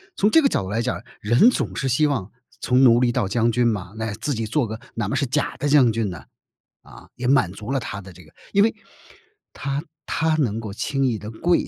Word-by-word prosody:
从 205 +2 +2
这 325 - +6
个 280 - +4
角 180 - -1
度 95 - -6
来 115 +3 -1
讲， 125 - -3 0.2
人 120 - +5
总 - - -3
是 135 - -1
希 150 +5 +3
望 125 -9 -2 0.3
从 125 +1 +3
奴 120 -1 +6
隶 120 -1 +3
到 100 - 0
将 115 +3 +1
军 120 +1 +2
嘛， 100 -3 -2
那 110 -1 -3
自 145 +5 -3
己 115 -1 -2
做 125 +3 0
个 110 +1 -6 0.2
哪 - - -2
嘛 140 - -1
是 140 - +1
假 145 +3 -1
的 145 - -2
将 140 -5 +5
军 110 -2 -1
呢， 85 - -8 0.6
啊， - - -15
也 125 - -3
满 130 -9 +3
足 105 +6 -7
了 135 - +1
他 100 -5 -6
的 95 -1 -12
这 90 - -15
个 80 - -20 0.2
因 200 - +5
为 225 - +2 0.8
他 140 +2 -3 0.2
他 160 0 0
能 115 -7 0
够 105 -2 -6
轻 135 +5 -1
易 115 -4 0
地 105 - -7
跪 170 +11 +1
120 Hz, 260 characters per minute, -22 LUFS, 110-140 Hz, 0.8 s, 这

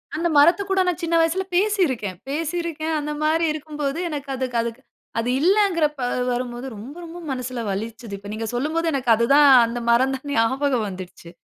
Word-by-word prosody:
அந்த 340 +2 0
மரத்து 340 +7 +5
கூட 385 0 +2
நான் 360 0 -1
சின்ன 335 0 +1
வயசுல 330 +4 +1
பேசிருக்கேன். 335 - +1
பேசிருக்கேன், 320 +1 -2
அந்த 300 +1 -4
மாரி 320 +2 +2
இருக்கும்போது 300 0 -4
எனக்கு 290 -3 -5
அதுக் 255 -2 -2
அதுக்கு 235 +2 -5 0.4
அது 230 +2 -1
இல்லங்கிறப்ப 335 -6 +2 0.3
வரும்போது, 245 0 -3
ரொம்ப 235 +8 -9
ரொம்ப 335 +1 -9
மனசுல 255 -1 -4
வலிச்சுது. 225 +2 -5
இப்ப 200 +1 -11
நீங்க 220 +1 -4
சொல்லும்போது 320 +6 -1
எனக்கு 255 -3 -2
அது 235 +2 +1
தான் 290 -1 +7 0.2
அந்த 235 +1 -4
மரம் 260 +3 +3
தான் 265 +2 -9
ஞாபகம் 250 0 +1
வந்துட்ச்சு. 185 -2 -9
280 Hz, 170 wpm, -22 LUFS, 235-330 Hz, 0.4 s, தான்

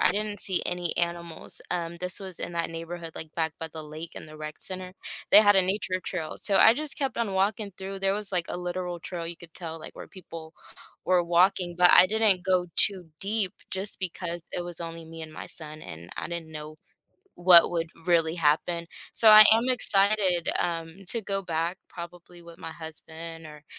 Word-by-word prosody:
I - - +4
didn't 210 0 -3
see 190 -2 +1
any 175 -1 -1
animals, 170 -1 -3
um, 170 -1 -2
this 180 +3 -5
was 190 -3 -8
in - - -5
that 170 -1 -1
neighborhood, 165 0 -7
like, 160 -1 -8
back 160 -2 -1
by 160 - -5
the 160 -1 -6
lake 155 +2 -9
in - - -8
the 155 - -12
rec 155 0 -7
center, 185 -1 -6 0.4
they - - +10
had 205 -2 +5
a 190 - +6
nature 185 -1 -1
trail, 165 -4 -4
so 200 -2 +1
I 225 - +7
just 300 +2 -4
kept 270 -4 -2
on 225 -4 -1
walking 200 +2 0
through, 195 0 -6
there 195 0 +2
was, 210 -1 -3
like, 180 -3 0
a - - -3
literal 180 0 -4
trail, 170 0 -5
you 170 - -7
could 170 -2 -13
tell, 165 -2 -6
like, - - -11
where - - -8
people 165 -3 -10 0.5
were 180 -1 +4
walking, 175 0 +2
but 180 0 +7
I 185 - +8
didn't 210 -3 +3
go 185 -2 +2
too 190 -4 +3
deep 200 -1 +1 0.2
just 190 +2 -4
because 175 -2 -4
it 175 - -2
was 175 -1 -7
only 165 -1 -7
me 165 0 -9
and 155 -1 -8
my - - -7
son, 155 -1 -8
and 85 - -10
I - - -4
didn't 170 -2 -5
know 155 0 -8 0.6
what 175 -1 +8
would 165 -1 -1 0.2
really 165 -1 +2
happen, 170 +2 +1 0.3
so 225 - +4
I 215 0 +11
am 230 +3 +3
excited, 200 -7 +2
um, 165 0 -2
to 230 - -1
go 195 -1 -3
back 170 +1 -2
probably 175 0 -10
with 170 0 -13
my 165 - -7
husband 160 0 -9
or 150 -1 -13
175 Hz, 205 wpm, -27 LUFS, 165-190 Hz, 0.6 s, I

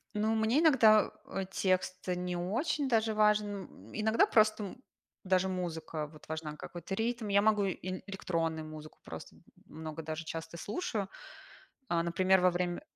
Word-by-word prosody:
Ну 215 +1 +1
мне 220 +6 +3
иногда, 235 -10 +6 0.2
э, 195 - -3
текст 185 -1 0
не 180 0 -1
очень 265 - 0
даже 225 -2 +2
важен. 210 0 +4 0.2
М, 100 +4 -15
иногда 220 +1 +3
просто, 215 -1 +3
м, 250 +6 -9 0.4
даже 185 0 +2
музыка 165 -4 -3
вот 155 0 -16
важна, 155 -1 -4
какой-то 175 +4 -6
ритм. 225 +1 -1
Я 200 0 +4
могу 210 -1 +3
и 190 - 0 0.2
ин 185 - -5
электронную 165 -5 -2
музыку 155 0 -10
просто, - - -9
м - - -21 0.2
много 160 0 -7
даже, 160 +1 -4
часто 165 +1 -6
слушаю. 210 - -3 0.8
А, 170 -2 +2
например, 185 +3 +3
во 180 0 +5
время 175 0 -1
185 Hz, 160 wpm, -32 LUFS, 165-215 Hz, 0.8 s, иногда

